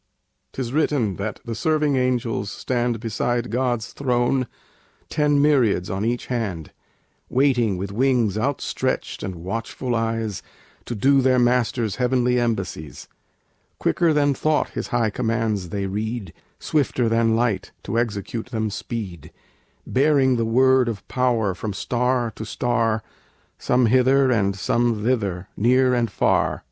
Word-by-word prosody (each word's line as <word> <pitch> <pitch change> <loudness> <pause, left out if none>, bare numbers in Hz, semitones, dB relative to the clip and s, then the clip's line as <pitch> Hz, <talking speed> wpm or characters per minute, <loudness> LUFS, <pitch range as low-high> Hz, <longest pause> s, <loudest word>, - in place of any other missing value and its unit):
'Tis 125 -2 -4
written 140 - +1
that 105 +2 -4
the 115 - -4
serving 150 +4 +1
angels 125 -5 0
stand 120 0 -1
Beside 120 +1 -2
God's 120 -2 -1
throne, 125 -1 0 0.6
ten 145 -1 +2
myriads 125 -12 +2
on 95 +2 -2
each 120 +2 -1
hand, 100 -11 -3 0.6
Waiting, 125 -7 +2
with 95 +2 -4
wings 120 -2 +2
outstretched 130 +6 -2
and 95 - -4
watchful 115 +8 -4
eyes, 115 -3 -1 0.4
To 120 - -4
do 135 +6 +4
their 130 0 +3
Master's 120 -3 +1
heavenly 125 -1 +2
embassies. 95 - -3 0.7
Quicker 170 -2 +2
than 145 -2 +3
thought 155 +2 0
His - - -5
high 120 -4 0
commands 110 -5 -1
they 100 +2 -2
read, 105 -1 -4 0.3
Swifter 130 -5 0
than 115 0 +2
light 115 -5 0
to 115 - -1
execute 110 0 -3
them 110 -4 -2
speed; 100 - -6 0.5
Bearing 135 -1 +3
the 115 -1 0
word 130 +2 +4
of 100 -4 -6
power 120 -6 +1
from 105 +3 -5
star 125 +2 0
to - - -5
star, 115 -1 0 0.6
Some 125 0 +2
hither 130 +3 +4
and 100 -4 +1
some 115 +2 0
thither, 100 -7 -1
near 125 +3 +3
and 120 -2 +1
far. - - +1
120 Hz, 135 wpm, -23 LUFS, 110-130 Hz, 0.7 s, do